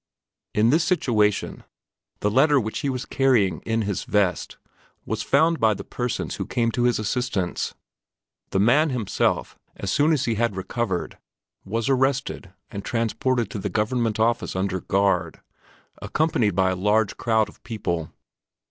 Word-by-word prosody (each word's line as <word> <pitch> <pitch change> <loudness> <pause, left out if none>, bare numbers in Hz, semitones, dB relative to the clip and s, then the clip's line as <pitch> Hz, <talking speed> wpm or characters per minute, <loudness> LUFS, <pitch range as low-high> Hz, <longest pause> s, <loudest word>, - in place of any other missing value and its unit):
In 110 +3 +4
this 160 +3 +3
situation, 110 - +1 0.6
the 105 - +1
letter 140 +4 +4
which 110 -2 -3
he 140 - -1
was 130 0 -3
carrying 125 -9 +2
in 115 0 +1
his 100 -2 -2
vest 100 -4 0 0.5
was 110 0 -2
found 160 +6 +2
by 110 -2 +3
the - - -7
persons 125 -1 -3
who - - -4
came 115 -2 0
to 120 +1 0
his 125 - +3
assistance; 110 -4 -2 0.7
the - - -1
man 140 +10 +4
himself, 125 -6 -1 0.2
as 100 - -3
soon 150 - +3
as 145 -3 +1
he 115 - +1
had 115 -2 0
recovered, 95 0 -3 0.5
was 110 +3 -2
arrested 135 -6 0 0.2
and 100 -1 -6
transported 115 -1 -1
to 105 - -4
the 100 - -3
Government 110 +2 0
Office 115 -2 +1
under 95 0 -1
guard, 100 0 0 0.6
accompanied 135 - +1
by 95 0 +3
a - - -1
large 105 +3 +1
crowd 110 -2 +2
of - - -17
people. 85 -9 -3
115 Hz, 155 wpm, -24 LUFS, 100-125 Hz, 0.7 s, In